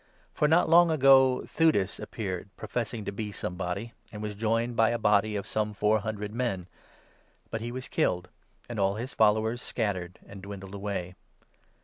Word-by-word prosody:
For 150 - +2
not 165 +3 +4
long 170 +1 +6
ago 135 -4 +5
Theudas 130 - +1
appeared, 95 -3 -5
professing 110 +1 -3
36 - - -9
to - - -2
be 105 +1 -4
somebody, 90 +4 -4 0.2
and 105 - -8
was 105 -1 -3
joined 115 +3 0
by 115 -1 +4
a 120 - 0
body 105 -1 +2
of 100 - -3
some 105 -1 -2
four 105 +2 +2
hun 110 +1 -3
dred 105 0 -6
men. 115 -7 -2 0.9
But 110 - -3
he 120 +1 -4
was 130 +1 -6
killed; 90 +1 0 0.4
and 120 -3 -5
all 100 0 +2
his 120 +5 -5
followers 110 +2 +2
scattered 95 -6 -3
and 100 -1 -11
dwindled 95 0 -8
away. 100 -3 -4
110 Hz, 175 wpm, -28 LUFS, 100-120 Hz, 0.9 s, long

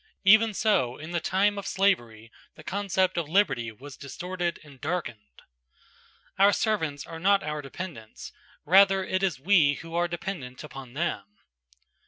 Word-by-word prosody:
Even 215 +3 +6
so 130 - +1
in 155 +3 -9
the 175 - 0
time 200 +4 +1
of 200 - -7
slavery, 120 - 0 0.2
the 155 - -13
concept 190 -1 0
of 155 -3 -4
liberty 140 - +1
was 130 +5 -12
distorted 175 +4 -4
and 140 -4 -16
darkened. 120 - -5 1.0
Our 200 +1 +6
servants 160 -10 -1
are 165 -1 -8
not 195 +3 +3
our 150 -1 -3
dependents, 140 -6 -8 0.3
rather 195 +3 +5
it 185 0 -1
is 180 -9 0
we 155 -3 +4
who 165 +3 -10
are 175 +1 +1
dependent 170 -7 -6
upon 135 -4 -10
them. 150 -9 -2
170 Hz, 150 wpm, -27 LUFS, 140-195 Hz, 1.0 s, Even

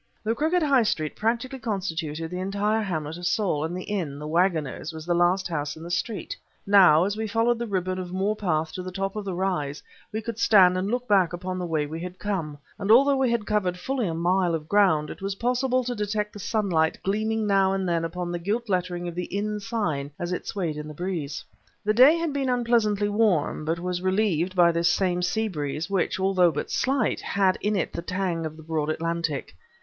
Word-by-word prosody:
The 220 +1 +1
crooked 320 +7 +1
high 280 -4 +4
street 155 -9 -1
practically 240 +4 -1
constituted 165 -7 -3
the 180 - -4
entire 200 +3 0
hamlet 160 -5 -3
of 175 0 -3
Saul, 185 -5 0
and 170 +3 -3
the 185 - -5
inn, 175 -9 -3
"The 150 - -7
Wagoners," 160 -2 0
was 160 -1 -8
the 175 - +1
last 175 +2 +2
house 150 -3 -3
in 160 - -10
the 170 - -7
street. 190 +4 -2 0.3
Now, 185 -6 +6
as 200 +2 -1
we 220 0 -3
followed 230 +2 +1
the 235 - -3
ribbon 185 -2 -1
of 180 -1 -6
moor 195 +3 0
path 160 -6 -1
to 185 - -4
the 185 0 -6
top 195 +2 -3
of 210 -1 -4
the 190 -2 -3
rise, 175 -6 -2 0.3
we 215 - -2
could 225 0 -6
stand 185 -5 +6
and 185 +2 -1
look 245 +2 -2
back 190 -5 +3
upon 185 +1 -4
the 180 - -3
way 155 -3 0
we 160 +3 -6
had 180 +1 -7
come; 175 -8 -3 0.2
and 200 - -3
although 275 +5 +6
we 265 -2 +2
had 235 -3 0
covered 190 -4 0
fully 250 +3 -2
a 165 - -2
mile 175 +1 +2
of 155 -1 -6
ground, 185 -7 +3
it - - -10
was 195 0 -2
possible 250 +3 +1
to 245 0 -2
detect 210 -1 -2
the 205 - -9
sunlight 185 -7 +1
gleaming 215 +2 0
now 195 -2 +3
and 195 -1 -1
then 170 -1 0
upon 175 +1 -3
the 175 - -3
gilt 215 +6 -2
lettering 180 -2 -1
of 175 - -4
the 180 +1 -3
inn 210 +2 -3
sign 200 - -2
as 175 +1 -4
it 180 - -4
swayed 170 -7 -2
in 150 0 -6
the 150 - -9
breeze. 165 -5 -4 0.4
The 215 - +3
day 260 +8 +7
had 330 -3 -2
been 275 -2 -1
unpleasantly 230 -4 +2
warm, 205 -8 +1
but 165 +2 0
was 180 0 -3
relieved 185 -2 +1
by 175 -1 +6
this 170 +1 +2
same 180 -1 +1
sea 220 +5 0
breeze, 150 0 -4
which, 190 -1 0
although 190 -2 +4
but 150 - -4
slight, 245 +7 0
had 190 -2 +1
in 210 +1 0
it 190 - -1
the 170 - -3
tang 175 -2 -2
of 155 0 -10
the 160 - -12
broad 155 -1 -2
Atlantic. 165 -2 -2
185 Hz, 225 wpm, -25 LUFS, 170-210 Hz, 0.4 s, day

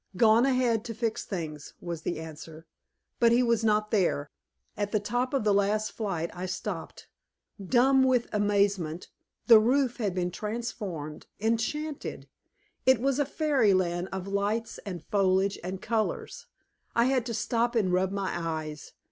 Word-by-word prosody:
"Gone 225 +4 +5
ahead 250 -4 +2
to 230 -2 -5
fix 225 -1 -2
things," 155 -6 -6
was 170 -2 -5
the 175 - -3
answer. 160 0 -9 0.5
But 235 -1 +5
he 245 +2 +4
was 235 -2 +2
not 215 -1 +2
there. 170 -8 +1 0.4
At 205 0 -2
the 215 - +2
top 245 +5 -1
of 275 -5 0
the 210 -1 +3
last 205 +2 +1
flight 175 -7 -3
I 180 +1 -5
stopped, 185 - -5 0.6
dumb 260 +6 +4
with 255 -2 +3
amazement; 200 -5 +1 0.4
the 230 -3 +9
roof 250 +3 +2
had 205 -6 -1
been 180 -1 -1
transformed, 205 -8 -5
enchanted. 230 +8 -2 0.6
It 260 -3 +5
was 275 +2 +1
a 290 - +3
fairy 275 - +2
land 175 0 0
of 190 0 -5
lights 205 +3 -1
and 180 -3 -5
foliage 195 -1 +1
and 185 +1 -5
colors. 220 -1 -2 0.5
I 235 - +4
had 260 -1 +2
to 230 - -3
stop 235 +2 0
and 195 -5 +2
rub 185 +1 +2
my 200 -1 -2
eyes. 155 -3 -4
210 Hz, 155 wpm, -28 LUFS, 185-235 Hz, 0.6 s, the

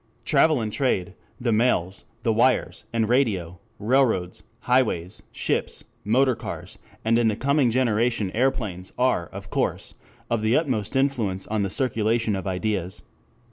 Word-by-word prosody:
Travel 150 0 +4
and 110 -1 -3
trade, 100 -8 0 0.3
the 120 -1 0
mails, 105 -5 +1 0.2
the 115 - +2
wires, 125 +3 +1
and 115 -2 +1
radio, 100 -9 +1 0.2
railroads, 110 -5 +1 0.2
highways, 110 -8 +1
ships, - - -1 0.2
motor 130 +5 +3
cars, - - -7 0.3
and 115 +1 +3
in 120 - +3
the 110 - +1
coming 140 +1 +2
generation 115 -4 +1
aeroplanes, 110 -7 -1
are, 125 -9 +1
of - - -10
course, - - -1 0.3
of 115 -2 0
the 110 +3 +3
utmost 125 -10 -1
influence 120 -9 0
on 110 -1 -1
the 100 - 0
circulation 115 -2 +1
of 95 0 -4
ideas. 95 -1 -2
110 Hz, 140 wpm, -24 LUFS, 100-130 Hz, 0.3 s, Travel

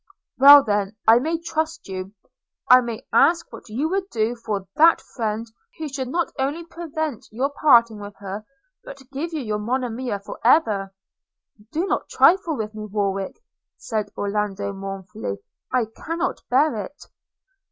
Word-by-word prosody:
'Well, 285 +1 +10
then, 205 -2 -1
I 225 +2 +8
may 320 +6 -1
trust 320 0 -3
you 190 0 -6 0.3
– - - -63
I 255 - +6
may 235 -2 -6
ask 335 0 +3
what - - -11
you 260 +9 -1
would 385 +1 -2
do 225 +1 0
for 210 -4 -4
that 330 +2 +6
friend 220 -2 -4 0.3
who 315 - -4
should 270 -2 -4
not 340 +6 -1
only 290 +6 -1
prevent 315 -6 -5
your 260 +6 -1
parting 235 -7 +4
with 205 0 -9
her, 200 +1 -6 0.4
but 270 -2 -11
give 300 +5 -4
you 315 -3 -3
your 215 -4 -2
Monimia 245 0 -2
for 200 - -10
ever!' 215 -7 +3 0.8
'Do 330 +4 -1
not 390 - -2
trifle 340 -5 +4
with 215 0 -4
me, 215 0 -6
Warwick,' 200 - -2 0.3
said 215 -2 -3
Orlando 200 -1 -2
mournfully, 190 - -6 0.3
'I 250 -3 +2
cannot 335 +3 -3
bear 280 +2 +3
it!' 290 +10 -12
240 Hz, 155 wpm, -23 LUFS, 205-310 Hz, 0.8 s, Well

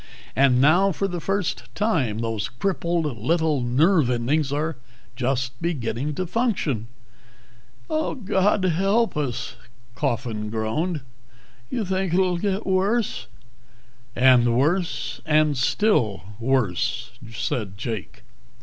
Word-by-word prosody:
And 130 -2 +4
now 175 +8 +5
for 195 +3 -1
the 175 -2 -4
first 195 +1 -1
time 160 - +1
those 115 -2 -2
crippled 170 +3 -1
little 160 +2 +1
nerve 145 +4 +3
endings 135 +4 +1
are 155 +1 -1 0.4
just 130 +1 -2
beginning 140 -3 -2
to 185 - -2
function." 175 - -1 1.0
"God 210 -10 +1
help 195 +6 +2
us," 140 -6 -3 0.4
Coffin 115 -5 -2
groaned. 125 +10 -1 0.7
"You 225 - -2
think 190 -2 0
it'll 180 -2 +2
get 200 +2 -1
worse?" 195 +4 0 0.9
"And 120 -2 +5
worse. 135 -5 0
And 155 -1 +3
still 130 - +1 0.2
worse," 120 -7 0 0.2
said 110 -3 -3
Jake. 110 -1 -5
150 Hz, 105 wpm, -24 LUFS, 120-185 Hz, 1.0 s, now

